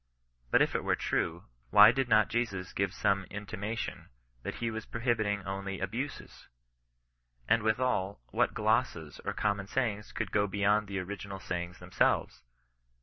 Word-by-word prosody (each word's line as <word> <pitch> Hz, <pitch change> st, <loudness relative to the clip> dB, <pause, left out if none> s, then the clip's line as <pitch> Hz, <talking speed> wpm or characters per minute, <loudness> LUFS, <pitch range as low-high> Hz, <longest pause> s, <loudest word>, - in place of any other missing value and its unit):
But -, -, +5 dB
if -, -, -1 dB
it -, -, -1 dB
were -, -, +2 dB
true, 85 Hz, +1 st, -1 dB, 0.3 s
why 105 Hz, -, +9 dB
did 130 Hz, 0 st, -1 dB
not 110 Hz, -2 st, +5 dB
Jesus 105 Hz, -6 st, -2 dB
gire 100 Hz, -, +1 dB
some 100 Hz, 0 st, 0 dB
intimation 105 Hz, +3 st, -5 dB, 0.3 s
that -, -, -5 dB
he 115 Hz, -1 st, -2 dB
was 110 Hz, 0 st, -4 dB
prohibiting 110 Hz, -4 st, 0 dB
only 95 Hz, 0 st, -4 dB
(duues? 115 Hz, +10 st, -5 dB, 1.0 s
And 115 Hz, -, +4 dB
withal, 110 Hz, -3 st, 0 dB
what -, -, +1 dB
glosses 110 Hz, -, 0 dB
or -, -, -2 dB
common 100 Hz, -2 st, -1 dB
sayings 105 Hz, -4 st, -1 dB
could -, -, -3 dB
go 105 Hz, 0 st, +2 dB
beyond 105 Hz, +1 st, +2 dB
the 100 Hz, 0 st, -4 dB
original 95 Hz, +1 st, -5 dB
sayings 90 Hz, -1 st, -4 dB
themselves 90 Hz, +1 st, 0 dB
105 Hz, 145 wpm, -31 LUFS, 95-110 Hz, 1.0 s, why